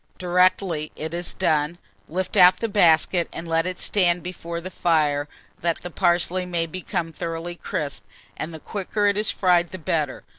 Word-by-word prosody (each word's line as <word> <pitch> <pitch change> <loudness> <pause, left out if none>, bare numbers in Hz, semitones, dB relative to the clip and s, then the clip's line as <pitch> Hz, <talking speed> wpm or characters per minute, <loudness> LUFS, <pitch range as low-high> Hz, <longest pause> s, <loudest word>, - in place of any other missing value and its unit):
Directly 180 -3 +1
it 160 +2 -5
is 175 0 -3
done, 155 -2 +1 0.3
lift 185 +5 -3
out 180 -1 +7
the 230 - -2
basket, 175 -3 +3
and 165 - -7
let 165 +1 +1
it 185 0 -4
stand 175 -4 +1
before 170 -1 -5
the 185 +2 -7
fire, 150 -5 +1 0.3
that 170 -1 -1
the 180 - -6
parsley 175 +1 +1
may 175 -2 -1
become 170 0 -4
thoroughly 165 +2 -4
crisp; 165 -4 -4 0.3
and 155 - -5
the 160 - -8
quicker 205 +4 -2
it 200 0 +3
is 210 +1 +1
fried 175 -3 +2
the 185 - -7
better. 155 -4 -2
175 Hz, 175 wpm, -24 LUFS, 165-185 Hz, 0.3 s, out